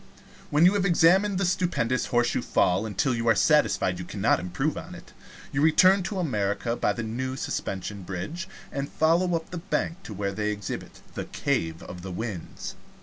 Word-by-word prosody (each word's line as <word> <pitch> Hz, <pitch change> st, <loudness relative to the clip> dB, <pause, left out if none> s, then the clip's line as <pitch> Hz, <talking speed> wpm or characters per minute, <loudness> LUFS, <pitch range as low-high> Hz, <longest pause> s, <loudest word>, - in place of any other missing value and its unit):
When 150 Hz, +3 st, +4 dB
you 185 Hz, -, +6 dB
have 200 Hz, -2 st, +1 dB
examined 190 Hz, +3 st, +4 dB
the 195 Hz, -, +1 dB
stupendous 170 Hz, -9 st, 0 dB
Horseshoe 120 Hz, 0 st, +1 dB
Fall 95 Hz, +5 st, +1 dB
till 130 Hz, -, +2 dB
you 115 Hz, 0 st, -2 dB
are 115 Hz, -, +5 dB
satisfied 100 Hz, -, +3 dB
you -, -, -4 dB
cannot 100 Hz, +4 st, +1 dB
improve 90 Hz, +1 st, -2 dB
on -, -, -7 dB
it, -, -, -14 dB, 0.4 s
you 145 Hz, -, 0 dB
return 185 Hz, +5 st, +6 dB
to 190 Hz, +2 st, -4 dB
America 115 Hz, -, -1 dB
by -, -, +1 dB
the 120 Hz, -, -4 dB
new 130 Hz, +4 st, -3 dB
Suspension 100 Hz, -5 st, -4 dB
Bridge, 95 Hz, -, -5 dB, 0.2 s
and 140 Hz, 0 st, -3 dB
follow 170 Hz, +3 st, +2 dB
up 160 Hz, -1 st, -4 dB
the 180 Hz, -, -4 dB
bank 175 Hz, 0 st, -2 dB
to 110 Hz, -, -8 dB
where 100 Hz, 0 st, -2 dB
they 105 Hz, +1 st, -1 dB
exhibit 105 Hz, -2 st, -5 dB
the -, -, -4 dB
Cave 80 Hz, 0 st, -2 dB
of 90 Hz, 0 st, -9 dB
the 95 Hz, +1 st, -6 dB
Winds. 95 Hz, -2 st, -5 dB
125 Hz, 185 wpm, -26 LUFS, -, 0.4 s, you